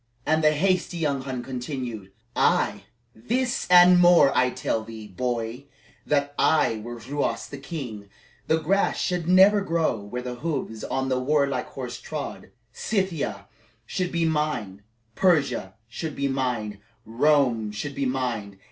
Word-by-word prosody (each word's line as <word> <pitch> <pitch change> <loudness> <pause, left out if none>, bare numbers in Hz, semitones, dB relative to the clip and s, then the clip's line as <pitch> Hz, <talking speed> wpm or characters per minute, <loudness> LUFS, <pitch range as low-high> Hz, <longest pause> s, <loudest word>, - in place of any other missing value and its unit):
And 160 0 +2
the 155 0 +5
hasty 185 +2 0
young 145 -5 0
Hun 130 -2 -5
continued: 125 -6 -5 0.2
"Ay, - - +1 0.3
this 245 - -1
and 180 0 +8
more! 175 -5 +6
I 125 0 +4
tell 115 -2 -2
thee, 110 -1 -9
boy, 120 +4 -3 0.4
that 145 -1 +1
were - - -25
I 115 -8 +3 0.3
Ruas 145 +1 -1
the 140 - -9
king, 125 - -7 0.4
the 160 - +3
grass 185 +6 +1
should 180 -3 -1
never 190 +3 +6
grow 165 - 0
where 105 +5 -6
the 125 -1 -5
hoofs 135 -9 -3
of 135 0 -2
my 130 - +1
war 140 +3 +2
horse 125 -2 -5
trod; 155 -2 -6 0.2
Scythia 190 - -2 0.4
should 180 -1 -2
be 170 -1 +1
mine; 150 -12 -1 0.3
Persia 140 - +1
should 155 +5 -5
be 140 - -1
mine; 125 -6 -2 0.3
Rome 120 -2 +2
should 105 +8 -5
be 135 -1 -1
mine. 120 -7 -3
140 Hz, 145 wpm, -25 LUFS, 120-160 Hz, 0.4 s, and